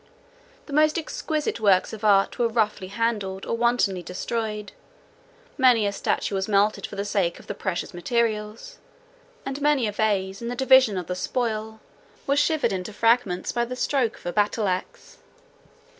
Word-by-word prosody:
The 290 Hz, -, -9 dB
most 305 Hz, +1 st, +3 dB
exquisite 310 Hz, -3 st, -3 dB
works 200 Hz, -3 st, +3 dB
of 220 Hz, 0 st, -8 dB
art 200 Hz, -2 st, +3 dB
were 240 Hz, -, +3 dB
roughly 215 Hz, -4 st, -1 dB
handled, 200 Hz, -2 st, -2 dB
or -, -, -1 dB
wantonly 230 Hz, -6 st, +1 dB
destroyed; 210 Hz, +3 st, -4 dB, 0.9 s
many 245 Hz, -5 st, +5 dB
a 200 Hz, -, +1 dB
statue 200 Hz, -, -2 dB
was 190 Hz, 0 st, -1 dB
melted 205 Hz, 0 st, +2 dB
for -, -, -10 dB
the 200 Hz, -, -3 dB
sake 190 Hz, -4 st, 0 dB
of -, -, -15 dB
the -, -, -5 dB
precious 190 Hz, -3 st, -4 dB
materials; 220 Hz, -, -2 dB, 0.7 s
and 270 Hz, +1 st, -4 dB
many 290 Hz, -4 st, +3 dB
a 210 Hz, -, -1 dB
vase, 200 Hz, -2 st, -1 dB
in 235 Hz, -, -4 dB
the 245 Hz, -, -3 dB
division 260 Hz, -5 st, +5 dB
of 180 Hz, -, -3 dB
the 180 Hz, -, -3 dB
spoil, 220 Hz, +2 st, -3 dB, 0.4 s
was 280 Hz, 0 st, +2 dB
shivered 290 Hz, -7 st, +1 dB
into 185 Hz, +2 st, -4 dB
fragments 225 Hz, -5 st, +1 dB
by 240 Hz, -, 0 dB
the 250 Hz, +1 st, -5 dB
stroke 250 Hz, -3 st, 0 dB
of -, -, -19 dB
a 175 Hz, -, -3 dB
battle 210 Hz, 0 st, +1 dB
axe. 185 Hz, 0 st, -5 dB
215 Hz, 170 wpm, -24 LUFS, 195-245 Hz, 0.9 s, many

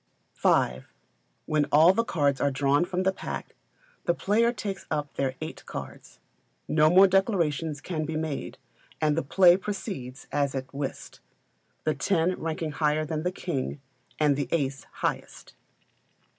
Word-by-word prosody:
v. 65 Hz, +1 st, +2 dB, 0.6 s
When 150 Hz, -1 st, +1 dB
all 160 Hz, +5 st, +7 dB
the 230 Hz, -, +1 dB
cards 145 Hz, -10 st, 0 dB
are 140 Hz, -, +3 dB
drawn 140 Hz, +4 st, +2 dB
from 185 Hz, 0 st, -2 dB
the 190 Hz, -, +3 dB
pack, 190 Hz, -, -6 dB, 0.5 s
the 170 Hz, -, +2 dB
players 230 Hz, +6 st, +2 dB
take 195 Hz, -2 st, -3 dB
up 145 Hz, -1 st, -2 dB
their 135 Hz, -1 st, -1 dB
eight 155 Hz, -, -6 dB
cards. -, -, -8 dB, 0.5 s
No 155 Hz, 0 st, +4 dB
more 185 Hz, +3 st, +8 dB
declarations 170 Hz, -7 st, +1 dB
can 155 Hz, -2 st, -3 dB
he 160 Hz, -, -3 dB
made, 155 Hz, -2 st, -3 dB, 0.4 s
and 150 Hz, -1 st, +2 dB
the 165 Hz, -, +1 dB
play 175 Hz, +5 st, +5 dB
proceeds 190 Hz, -, -6 dB
as 140 Hz, -1 st, 0 dB
at 130 Hz, 0 st, -5 dB
Whist, 140 Hz, -1 st, -5 dB, 0.6 s
the 155 Hz, -, +1 dB
ten 170 Hz, +3 st, +1 dB
ranking 160 Hz, -1 st, -3 dB
higher 150 Hz, +1 st, +1 dB
than 155 Hz, 0 st, -3 dB
the 180 Hz, +2 st, -1 dB
king, 150 Hz, -6 st, -3 dB, 0.4 s
and 150 Hz, -2 st, +4 dB
the 140 Hz, 0 st, -2 dB
ace 135 Hz, -4 st, -1 dB
highest. -, -, -4 dB
155 Hz, 150 wpm, -27 LUFS, 145-180 Hz, 0.6 s, more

